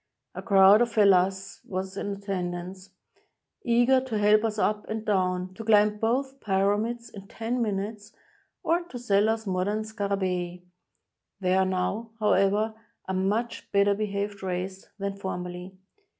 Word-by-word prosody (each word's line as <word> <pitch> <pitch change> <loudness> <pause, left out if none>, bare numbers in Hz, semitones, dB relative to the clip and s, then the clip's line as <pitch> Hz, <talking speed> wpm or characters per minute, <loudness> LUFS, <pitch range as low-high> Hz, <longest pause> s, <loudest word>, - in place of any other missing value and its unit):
A - - -6
crowd 200 0 +6
of 240 -1 +2
fellahs 195 -2 +2
was 190 0 -5
in 200 0 -3
attendance, 185 -1 -5 0.7
eager 245 +2 +3
to 255 -4 -3
help 210 +1 +4
us 220 -1 -1
up 210 0 0
and 220 0 -4
down, 185 -2 0
to 225 - -8
climb 210 -1 +4
both 265 +5 -1
Pyramids 210 +4 0
in 195 -1 -11
ten 235 +4 -3
minutes, 205 0 -3 0.5
or 340 +2 +2
to 265 - -8
sell 210 -3 +2
us 225 0 -1
modem 195 +3 -1
scarabcei. 190 -4 -2 0.8
They 185 -1 +1
are 190 0 +3
now, 190 +5 -2
however, 210 +1 +2 0.3
a 190 - -2
much 205 +6 -2
better 200 0 +4
behaved 200 -1 -3
race 190 +1 -4
than 200 -1 -4
formerly. 180 -1 -6
200 Hz, 140 wpm, -27 LUFS, 190-220 Hz, 0.8 s, crowd